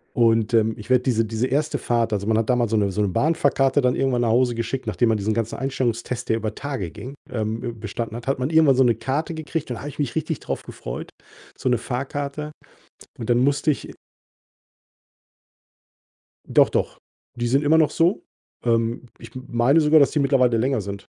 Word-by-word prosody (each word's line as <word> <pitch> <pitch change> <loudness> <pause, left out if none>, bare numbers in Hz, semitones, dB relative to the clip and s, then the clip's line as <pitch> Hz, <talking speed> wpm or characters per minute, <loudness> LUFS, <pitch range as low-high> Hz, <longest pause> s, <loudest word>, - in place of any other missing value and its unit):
Und, 115 -2 +3
ähm, 110 0 +3
ich 105 +3 -12
werde 125 -1 +4
diese 115 -4 +2
diese 110 +3 -1
erste 145 +4 0
Fahrt 115 -2 0
also, 100 0 -1
man 110 - +2
hat 110 +1 0
damals 120 -3 +2
so 110 - +3
'ne 100 -2 +1
so 95 - -3
'ne 100 - +1
Bahnfahrkarte 140 - +2
dann 125 -1 +2
irgendwann 130 -3 +1
nach 115 - +1
Hause 120 +1 +2
geschickt, 115 +3 -3
nachdem 120 - +1
man 110 - +1
diesen 105 +2 -1
ganzen 115 0 -2
Einstellungstest, 125 -3 -2
der 110 - +2
über 110 -1 -3
Tage 135 - -4
ging, 130 - -9 0.2
ähm, 110 -1 -2
b 120 -1 -4
bestanden 115 +1 -5
hat 120 - -9
hat 135 - 0
man 130 +3 -1
irgendwann 160 -4 +5
so 130 - +5
'ne 120 -2 +4
Karte 150 +5 -2
gekriegt. 160 -2 -4
Dann 120 - -3
habe 145 - -6
ich 145 - -10
mich 140 -5 -2
richtig 160 -1 -2
drauf - - -4
gefreut, - - -7 0.5
so 130 - -2
'ne 125 - +2
Fahrkarte. 140 +4 -4 0.7
Und 115 0 -4
dann 120 - +4
musste 140 +4 +2
ich 145 - -3
i - - -11 2.5
Doch, - - +4
doch, - - -2 0.3
die 120 0 -2
sind 135 +4 +2
immer 160 +2 +4
noch 155 -2 +4
so. 175 +4 +1 0.4
Ähm, 115 +1 0
ich - - -13
m 130 0 -8
meine 120 +7 +3
sogar, 155 0 +5
dass 140 - +5
die 150 - -1
mittlerweile 135 -4 +3
länger 130 +2 +1
sind. 100 0 -7
125 Hz, 210 wpm, -23 LUFS, 115-140 Hz, 2.5 s, irgendwann